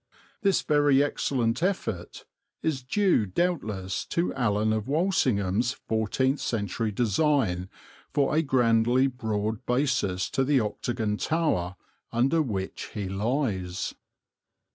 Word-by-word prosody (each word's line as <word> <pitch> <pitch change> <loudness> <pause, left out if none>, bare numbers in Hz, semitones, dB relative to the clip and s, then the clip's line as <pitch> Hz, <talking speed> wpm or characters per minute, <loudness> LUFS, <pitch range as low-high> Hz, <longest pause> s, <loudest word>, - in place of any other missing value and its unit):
This 200 -2 +2
very 145 -2 +4
excellent 125 -3 0
effect 170 - -2 0.4
is 150 -5 0
due 155 - +2
doubtless 105 - -1
to 170 +1 0
Alan 110 -4 +1
of 110 0 -2
Walsingham's 125 - +1
fourteenth 130 +6 0
century 105 0 -2
design 110 - +1 0.4
for 145 +1 +1
a 160 - +4
grandly 120 -2 +3
broad 110 -4 -2
basis 125 -8 +1
to 135 - +1
the 140 0 +3
octagon 110 -1 -2
tower 125 - 0 0.4
under 135 +8 +2
which 100 -9 -4
he 100 -3 -3
lies. 100 -4 -1
120 Hz, 110 wpm, -27 LUFS, 105-145 Hz, 0.4 s, very